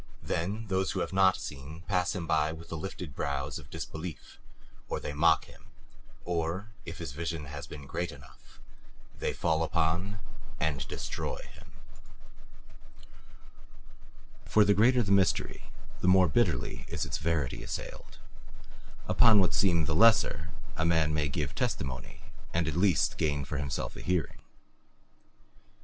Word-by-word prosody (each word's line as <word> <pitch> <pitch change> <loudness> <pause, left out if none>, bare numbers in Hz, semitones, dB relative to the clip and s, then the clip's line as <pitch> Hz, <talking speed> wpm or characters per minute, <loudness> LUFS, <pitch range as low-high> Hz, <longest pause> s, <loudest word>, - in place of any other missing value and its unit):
Then 100 +7 -2
those 95 -2 0
who - - -1
have - - -3
not 95 -1 +5
seen 75 +4 -7
pass 90 0 0
him 90 -3 -3
by 80 -1 +2
with 80 +1 -10
the - - -4
lifted 90 -2 -6
brows 70 +1 -2
of - - -14
disbelief, 80 0 -7 0.5
or - - -1
they 75 - -5
mock 80 +2 +4
him, - - -17 0.6
or 85 +5 -2
if 80 - -6
his 85 -6 -5
vision 80 +1 -4
has 75 0 -7
been 75 -2 -9
great 85 +5 -3
enough 70 -3 -16 0.6
they - - 0
fall 80 -1 +1
upon 85 +5 0 0.4
and 75 -3 -1
destroy - - -4 0.2
him. - - -16 2.7
For 105 -1 +4
the 100 - +5
greater 120 +5 +5
the 100 - -2
mystery, 95 -3 +2 0.3
the - - -1
more 90 0 +7
bitterly 70 - 0
is - - -2
its - - -3
verity 80 -5 -1
assailed; - - -7 0.9
upon 115 -3 +6
what 95 - +3
seem 85 -5 +3
the 80 - 0
lesser 85 -5 +4 0.3
a 80 - 0
man 80 -2 +3
may 75 -1 +1
give 70 -1 -2
testimony 65 -2 -3 0.3
and 85 -2 +2
at 80 - -1
least 90 -1 +2
gain 75 -2 0
for 70 +2 -3
himself 70 -1 -3
a - - -8
hearing. 90 -2 -1
80 Hz, 145 wpm, -30 LUFS, 75-95 Hz, 2.7 s, more